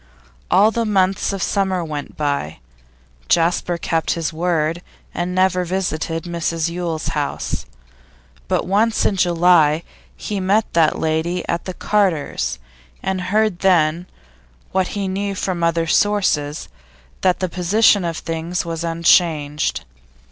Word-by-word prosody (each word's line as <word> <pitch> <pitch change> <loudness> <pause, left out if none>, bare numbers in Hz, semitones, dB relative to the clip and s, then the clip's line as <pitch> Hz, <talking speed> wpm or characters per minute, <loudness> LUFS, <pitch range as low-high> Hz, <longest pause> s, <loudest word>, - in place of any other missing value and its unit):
All 205 +4 +5
the 230 +1 -1
months 195 -3 +1
of 195 -2 -3
summer 190 -3 0
went 150 -2 -6
by. 140 - -2 0.7
Jasper 170 +1 +2
kept 165 -1 0
his 165 -1 -3
word, 165 0 0 0.3
and 180 +1 -3
never 185 -1 +2
visited 165 -3 -2
Mrs 170 -1 -2
Yule's 170 -2 -3
house; 145 -2 -3 0.8
but - - 0
once 215 +4 +2
in 200 - +2
July 170 -3 +3 0.3
he 205 -2 -4
met 200 +4 +2
that 165 -2 +3
lady 160 +3 -1
at 170 - -2
the 185 - -5
Carters', 190 - 0 0.5
and 190 -1 -1
heard 215 -3 +1
then, 175 -2 +2 0.6
what 190 -1 +1
he 200 -1 -1
knew 195 +1 -2
from 185 -3 -2
other 165 0 +1
sources, 160 -6 +1 0.5
that 185 -1 +2
the 185 - 0
position 190 +4 +3
of 165 -2 -2
things 165 +2 -3
was 165 0 -4
unchanged. 165 -3 +1
175 Hz, 130 wpm, -20 LUFS, 165-190 Hz, 0.8 s, All